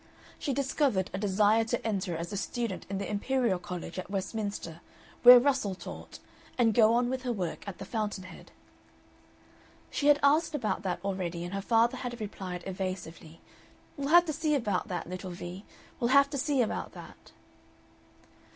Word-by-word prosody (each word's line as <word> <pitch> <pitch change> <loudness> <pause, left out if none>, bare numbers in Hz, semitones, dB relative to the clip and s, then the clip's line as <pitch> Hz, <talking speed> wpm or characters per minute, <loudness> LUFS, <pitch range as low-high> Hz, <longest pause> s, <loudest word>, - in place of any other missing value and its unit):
She 285 - -2
discovered 265 -7 0
a 190 - -3
desire 210 +2 +3
to 225 - -2
enter 190 -5 -2
as 170 +4 -5
a - - -2
student 225 0 -3
in 195 - -2
the 200 - -3
Imperial 225 -2 0
College 180 -1 -6
at 185 - -7
Westminster, 195 -4 -4 0.4
where 245 0 +11
Russell 255 -7 +1
taught, 175 - -9 0.4
and 230 -3 +3
go 225 +1 +5
on 240 0 +2
with 260 +1 -2
her 250 -1 -2
work 180 -7 -3
at 195 - -6
the - - -7
fountain 210 -4 -3
head. 185 - -12 1.4
She 285 - 0
had 290 0 +6
asked 305 +3 +3
about 235 -7 -1
that 180 -3 -3
already, 180 -3 -3
and 175 - -7
her 195 - -2
father 230 +3 +2
had 245 -1 -5
replied, 185 -4 -6
evasively: 185 -4 -6 0.5
"We'll 280 0 -3
have 345 +3 +7
to 310 - -2
see 305 0 +1
about 210 -9 -1
that, 175 -2 -4
little 185 +1 -6
Vee; 175 +2 -8 0.3
we'll 235 - +1
have 280 +2 +5
to 285 - -2
see 275 -2 +2
about 220 - -4
that." - - -13
210 Hz, 175 wpm, -29 LUFS, 185-255 Hz, 1.4 s, where